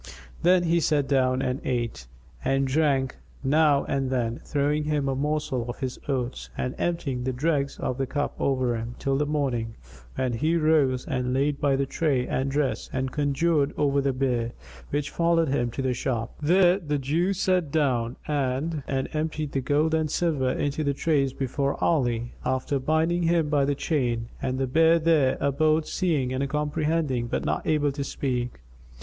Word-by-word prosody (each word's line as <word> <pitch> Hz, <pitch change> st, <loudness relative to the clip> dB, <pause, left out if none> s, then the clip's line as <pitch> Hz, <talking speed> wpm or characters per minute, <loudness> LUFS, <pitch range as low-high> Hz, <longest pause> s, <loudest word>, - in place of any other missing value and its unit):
Then 180 Hz, 0 st, +4 dB
he 170 Hz, 0 st, +2 dB
sat 150 Hz, -4 st, +1 dB
down 130 Hz, -1 st, +2 dB
and 130 Hz, +2 st, -2 dB
ate 115 Hz, -, -2 dB, 0.4 s
and 135 Hz, 0 st, +1 dB
drank, 135 Hz, -2 st, +1 dB, 0.3 s
now 145 Hz, 0 st, +4 dB
and 135 Hz, -1 st, -1 dB
then 120 Hz, -2 st, -1 dB
throwing 150 Hz, +1 st, 0 dB
him 150 Hz, -2 st, 0 dB
a 135 Hz, -, +1 dB
morsel 145 Hz, -4 st, -1 dB
of 120 Hz, -, -5 dB
his 130 Hz, -2 st, -4 dB
orts 125 Hz, -2 st, -2 dB
and 125 Hz, -, -2 dB
emptying 140 Hz, -8 st, -1 dB
the 130 Hz, -, -1 dB
dregs 140 Hz, +1 st, 0 dB
of 125 Hz, -, -3 dB
the 135 Hz, -, 0 dB
cup 145 Hz, +2 st, -2 dB
over 130 Hz, -3 st, +1 dB
him, 115 Hz, +2 st, -5 dB
till 135 Hz, 0 st, 0 dB
the 145 Hz, +2 st, 0 dB
morning, 125 Hz, -7 st, -1 dB, 0.4 s
when 130 Hz, -2 st, -1 dB
he 155 Hz, +8 st, +1 dB
rose 150 Hz, -5 st, +2 dB
and 125 Hz, 0 st, -1 dB
laid 140 Hz, +1 st, 0 dB
by 140 Hz, -2 st, +3 dB
the 135 Hz, 0 st, 0 dB
tray 135 Hz, -3 st, 0 dB
and 135 Hz, +2 st, -1 dB
the -, -, -5 dB
dress 145 Hz, -2 st, -1 dB
and 130 Hz, 0 st, -2 dB
conjured 145 Hz, +1 st, +1 dB
over 140 Hz, -1 st, +2 dB
the 135 Hz, 0 st, +1 dB
bear, 125 Hz, -3 st, -1 dB, 0.4 s
which 145 Hz, 0 st, -2 dB
followed 170 Hz, -2 st, +2 dB
him 120 Hz, -3 st, 0 dB
to 135 Hz, +3 st, -4 dB
the 130 Hz, -1 st, +1 dB
shop. 120 Hz, -1 st, -2 dB
There 180 Hz, +4 st, +4 dB
the 150 Hz, -5 st, -2 dB
Jew 155 Hz, +8 st, 0 dB
sat 185 Hz, -4 st, +1 dB
down 130 Hz, -6 st, +1 dB
and 145 Hz, +2 st, -1 dB
emptied 155 Hz, +2 st, -2 dB
the 135 Hz, -, -1 dB
gold 150 Hz, +4 st, +1 dB
and 160 Hz, -1 st, +1 dB
silver 150 Hz, -5 st, +1 dB
into 145 Hz, +3 st, -1 dB
the 140 Hz, -1 st, 0 dB
trays 140 Hz, -3 st, +1 dB
before 140 Hz, +2 st, -1 dB
Ali, 120 Hz, -7 st, +1 dB
after 130 Hz, +2 st, 0 dB
binding 160 Hz, +5 st, +1 dB
him 165 Hz, -2 st, +2 dB
by 145 Hz, -2 st, +2 dB
the 140 Hz, 0 st, 0 dB
chain; 120 Hz, -7 st, -1 dB
and 130 Hz, -1 st, -1 dB
the 135 Hz, -, 0 dB
bear 160 Hz, +5 st, +4 dB
there 155 Hz, -5 st, +3 dB
abode 155 Hz, +3 st, +2 dB
seeing 145 Hz, -8 st, 0 dB
and 135 Hz, +1 st, -1 dB
comprehending 150 Hz, -3 st, 0 dB
but -, -, -2 dB
not -, -, -1 dB
able 150 Hz, -2 st, +2 dB
to 140 Hz, 0 st, -4 dB
speak. 125 Hz, -, -3 dB
140 Hz, 180 wpm, -26 LUFS, 130-155 Hz, 0.4 s, Then